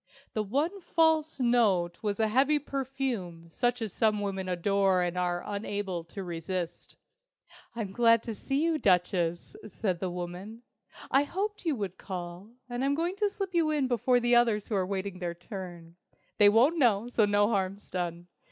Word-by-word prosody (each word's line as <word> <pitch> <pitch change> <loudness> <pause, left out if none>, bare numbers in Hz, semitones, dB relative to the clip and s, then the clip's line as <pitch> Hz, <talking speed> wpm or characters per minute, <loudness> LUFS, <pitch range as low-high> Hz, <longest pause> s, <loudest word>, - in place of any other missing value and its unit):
The 215 - 0
one 295 - -1
false 320 -3 +2
note 215 -9 +2
was 205 -1 -2
a 220 - +3
heavy 265 +7 +3
perfume 260 - -4
such 245 +4 0
as 210 -5 -4
some 215 -2 +2
women 195 -2 -3
adore 190 +1 +2
and 175 0 -2
are 175 -1 -1
unable 200 -3 -3
to 195 +3 -7
resist. 175 0 -4 0.8
"I'm 215 -5 -4
glad 230 +1 +4
to 230 - -4
see 275 +7 -1
you, 325 -2 +1
Duchess," 180 - +1
said 190 -4 -2
the 185 - -2
woman. 180 +6 -7 0.5
"I 270 - +5
hoped 390 +7 -3
you 315 -4 +1
would 200 -5 -5
call, 180 +1 -7 0.2
and 245 +1 -3
I'm 280 +1 +2
going 340 +4 -1
to 415 0 +2
slip 390 -2 -5
you 330 -2 +2
in 295 -4 +1
before 245 +1 +2
the 240 0 +3
others 230 -4 +3
who - - -2
are 185 -2 +1
waiting 195 -1 -4
their 175 -2 -3
turn. 175 -3 -9 0.4
They 205 -1 +8
won't 255 +11 +4
know, 230 -4 +3
so 235 -3 +3
no 205 0 +3
harm's 195 -1 -2
done! 175 -1 -3
205 Hz, 175 wpm, -29 LUFS, 180-255 Hz, 0.8 s, They